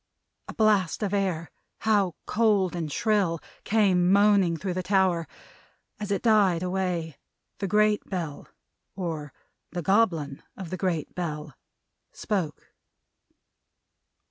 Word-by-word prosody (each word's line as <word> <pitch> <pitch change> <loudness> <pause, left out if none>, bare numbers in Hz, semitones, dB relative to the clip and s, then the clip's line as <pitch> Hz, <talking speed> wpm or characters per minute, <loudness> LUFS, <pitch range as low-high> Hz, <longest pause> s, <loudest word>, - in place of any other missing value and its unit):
A - - -8
blast 210 -4 +2
of 205 -1 -1
air 185 -5 -1 0.3
how 205 -6 +2
cold 205 -5 +2
and 160 -3 -3
shrill! 195 -4 +1 0.2
came 190 -4 +3
moaning 200 -4 +4
through 185 +2 -3
the 185 - -2
tower. 185 -4 +2 0.7
As 210 -1 -5
it 200 -1 -1
died 200 -7 +4
away, 180 -4 -2 0.4
the 195 - -1
Great 210 +2 +3
Bell, 165 -7 -4 0.5
or 160 -6 -4 0.4
the 175 -1 -4
Goblin 165 -8 +1 0.2
of 185 -4 -7
the 185 - -3
Great 170 -4 -2
Bell, 150 -4 -4 0.6
spoke. 180 - -3
185 Hz, 115 wpm, -26 LUFS, 165-205 Hz, 0.7 s, moaning